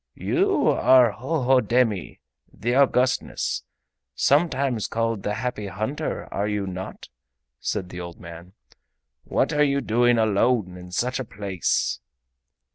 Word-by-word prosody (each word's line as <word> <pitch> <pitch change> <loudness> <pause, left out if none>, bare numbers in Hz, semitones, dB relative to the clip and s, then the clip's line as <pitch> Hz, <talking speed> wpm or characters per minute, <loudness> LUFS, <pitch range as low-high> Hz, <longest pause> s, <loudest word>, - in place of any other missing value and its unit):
"You - - +1
are 125 -3 +5
Hohodemi, 125 - +1 0.3
the 120 +3 -2
Augustness, 130 -1 +1 0.5
sometimes 140 - +1
called 115 -2 -1
the 105 +1 -2
Happy 115 -3 -3
Hunter, 110 - -4
are 100 +1 -1
you 105 -1 -1
not?" 95 0 -7 0.5
asked 95 -4 -2
the 90 0 -7
old 85 -1 -9
man. 85 +2 -11 0.7
"What - - 0
are 150 0 +3
you 140 -1 +2
doing 120 -1 +2
alone 110 -2 +2
in 90 0 -10
such 125 +7 -1
a - - -2
place?" 100 -5 -1
115 Hz, 120 wpm, -24 LUFS, 100-130 Hz, 0.7 s, are